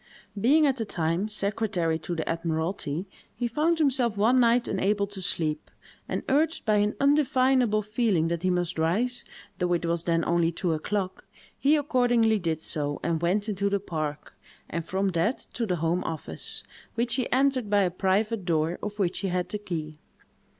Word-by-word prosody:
Being, 290 +9 +5
at 270 -2 +2
the 230 - -1
time, 170 +1 -1
secretary 200 -6 0
to 175 +2 -4
the 160 - -3
admiralty, 165 +1 -2 0.3
he 240 +1 -1
found 310 +8 +1
himself 260 -8 +1
one 235 +5 +4
night 240 0 +3
unable 200 +1 +1
to 200 -1 -8
sleep, 155 -4 -1 0.4
and - - -2
urged 310 +4 +1
by 215 -2 +3
an 205 +1 +1
undefinable 260 -6 +3
feeling 210 -6 +1
that 170 -1 -2
he 185 - +1
must 175 -2 -1
rise, 225 +10 +1 0.4
though 180 -1 +1
it 170 0 0
was 170 0 -1
then 165 -1 +1
only 170 -1 +2
two 170 0 -1
o'clock. 185 +4 -3 0.3
He 290 +3 +3
accordingly 245 -6 +2
did 165 -3 -2
so, 145 -1 -2
and 165 0 0
went 195 +5 +1
into 200 -1 0
the 200 0 +1
park, 155 -5 -4 0.3
and 170 - -3
from 190 +4 -1
that 180 +8 +1 0.2
to 235 -2 -2
the 180 - +1
home 165 +2 0
office, 160 -1 -5 0.3
which 235 +1 0
he 255 0 -1
entered 260 -4 +2
by 205 -1 +4
a 180 - +1
private 195 +4 0
door, 165 -1 0
of 210 0 -5
which 185 -4 0
he 195 - -2
had 180 -1 -1
the 210 - -4
key. 155 -6 -5
200 Hz, 180 wpm, -27 LUFS, 170-235 Hz, 0.4 s, Being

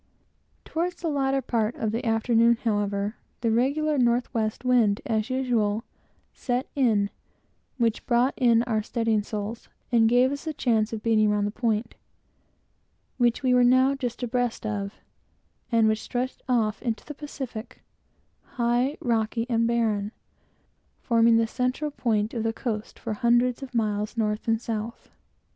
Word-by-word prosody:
Toward 345 +2 -2
the 340 -1 -4
latter 270 -2 0
part 230 -1 0
of 220 - -2
the 230 +2 -2
afternoon, 230 +1 +3
however, 205 -1 -1 0.2
the 230 -1 +1
regular 285 +5 +1
northwest 235 -1 0
wind, 230 -5 +3
as 220 0 -1
usual, 235 -5 0 0.5
set 250 +1 -2
in, 220 -7 +2 0.7
which 230 -3 0
brought 245 +2 +3
in 235 -3 +4
our 225 -3 0
studding 225 -1 0
sails, 210 +2 -6 0.2
and 225 -2 +4
gave 250 +2 +4
us 285 +2 -5
the 315 -1 -3
chance 225 -5 +1
of 220 -2 -5
beating 215 -2 +3
round 210 0 +1
the 205 - -2
Point, 225 -1 -1 1.2
which 240 +1 +2
we 255 -1 +3
were 250 0 +5
now 260 +2 +5
just 250 -3 -4
abreast 245 -1 -1
of, 200 -1 -3 0.8
and 230 -2 +4
which 220 0 +1
stretched 250 +1 -3
off 220 -4 +1
into 230 -3 -3
the 295 - -7
Pacific, 265 -6 -8 0.7
high, 240 +4 +1
rocky 230 -1 0
and 230 0 +2
barren, 220 -3 0 0.9
forming 230 -1 +4
the 230 - +3
central 255 +6 -2
point 220 -5 0
of 230 - -2
the 225 0 -1
coast 220 -3 -4
for 225 - -4
hundreds 240 +3 +2
of 265 -2 -8
miles 210 0 -1
north 210 -1 -1
and 225 -1 +2
south. 225 -1 -5
235 Hz, 150 wpm, -26 LUFS, 220-250 Hz, 1.2 s, were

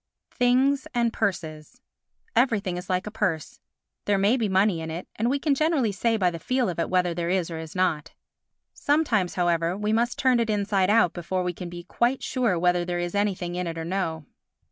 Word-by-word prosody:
Things 260 +3 +2
and 235 -1 +1
Purses 170 0 -3 0.6
Everything 220 -6 +2
is 180 +1 -7
like 185 0 0
a 210 - -5
purse—there 200 +1 -3
may 200 +5 +3
be 225 -5 0
money 190 -2 +2
in 160 - -5
it, 165 +3 -6
and 230 +3 0
we 275 - +1
can 285 +1 +1
generally 285 -6 +1
say 225 +4 0
by 180 -4 +2
the 165 - -6
feel 255 +5 0
of 170 - -4
it 165 - -1
whether 180 -1 +1
there 170 0 -2
is 180 -2 0
or 160 - -5
is 160 +1 -9
not. 160 -4 0 0.6
Sometimes, 265 - +1
however, 175 0 +1
we 210 +1 -1
must 235 +2 +1
turn 255 -2 +3
it 230 -1 0
inside 200 -2 +1
out 210 -5 +4
before 180 +1 -2
we 180 0 -2
can 175 0 -7
be 175 0 -8
quite 240 +8 0
sure 240 -9 0
whether 175 +1 +2
there 175 0 -3
is 175 0 -3
anything 195 -4 -1
in 180 0 -3
it 165 0 -5
or 165 - -4
no. 165 -4 -2
190 Hz, 210 wpm, -25 LUFS, 175-230 Hz, 0.6 s, out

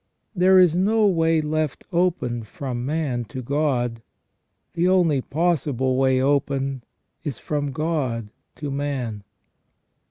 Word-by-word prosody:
There 185 +1 +5
is 180 -3 +6
no 210 +4 +3
way 165 -4 +3
left 155 -1 -2
open 170 -9 0
from 120 +2 -5
man 145 -6 -1
to 130 +2 -7
God; 125 -4 0 0.7
the 170 +1 +1
only 175 -7 +3
possible 145 -5 0
way 130 0 +3
open 135 -1 0 0.4
is 145 -7 -4
from 145 -2 -2
God 130 -8 -2 0.3
to 145 -2 -5
man. 135 -7 -3
145 Hz, 120 wpm, -23 LUFS, 130-165 Hz, 0.7 s, is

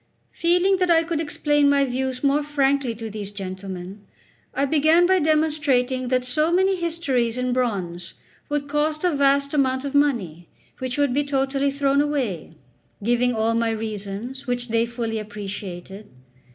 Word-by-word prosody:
Feeling 360 +3 +2
that 365 -1 +1
I 330 -1 +5
could 330 -1 -2
explain 295 -2 +2
my 280 -1 +3
views 260 0 -3
more 280 +1 +3
frankly 280 -4 0
to 225 0 -6
these 205 -1 -6
gentlemen, 190 0 -7 0.5
I 275 - 0
began 315 +4 +4
by 375 +1 +4
demonstrating 295 -5 +1
that 255 0 +1
so 305 +6 +1
many 380 +2 +3
histories 305 -9 -1
in 250 0 -1
bronze 185 -8 -2 0.3
would 290 -1 -2
cost 300 +2 -1
a 355 -4 +2
vast 280 0 +2
amount 260 -2 +1
of 280 - -4
money, 215 - 0 0.3
which 255 0 -3
would 285 -3 +2
be 290 +2 +2
totally 275 0 0
thrown 280 0 +2
away, 255 - -2 0.5
giving 240 +2 +2
all 225 +1 +1
my 230 0 +1
reasons, 220 +3 -5
which 245 -1 -2
they 230 +1 +1
fully 230 -2 -3
appreciated. 200 -1 -7
265 Hz, 155 wpm, -23 LUFS, 225-295 Hz, 0.5 s, I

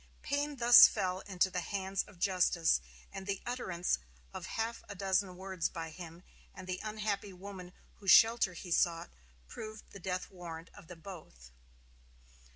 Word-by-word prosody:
Payne 290 0 -1
thus 240 -1 +10
fell 185 -3 -2
into 190 -1 +1
the 180 - -1
hands 195 +1 -2
of 195 - -16
justice, 175 - +2 0.3
and 195 0 -7
the 195 -1 -1
utterance 185 - -1 0.3
of - - -6
half 225 +1 -3
a 205 - -6
dozen 190 -1 0
words 190 -2 -2
by 165 -2 -6
him 170 +1 -10 0.3
and 185 - -9
the 185 0 -4
unhappy 210 -2 -3
woman 185 -1 -9 0.3
whose 195 -2 -4
shelter 225 -2 +6
he 175 +1 -9
sought 165 - +1 0.4
proved 215 - -8
the 195 - -10
death 185 0 -4
warrant 170 -3 -9
of 200 -5 -14
them 170 -1 -12
both. 110 - -11
190 Hz, 160 wpm, -33 LUFS, 175-205 Hz, 0.4 s, thus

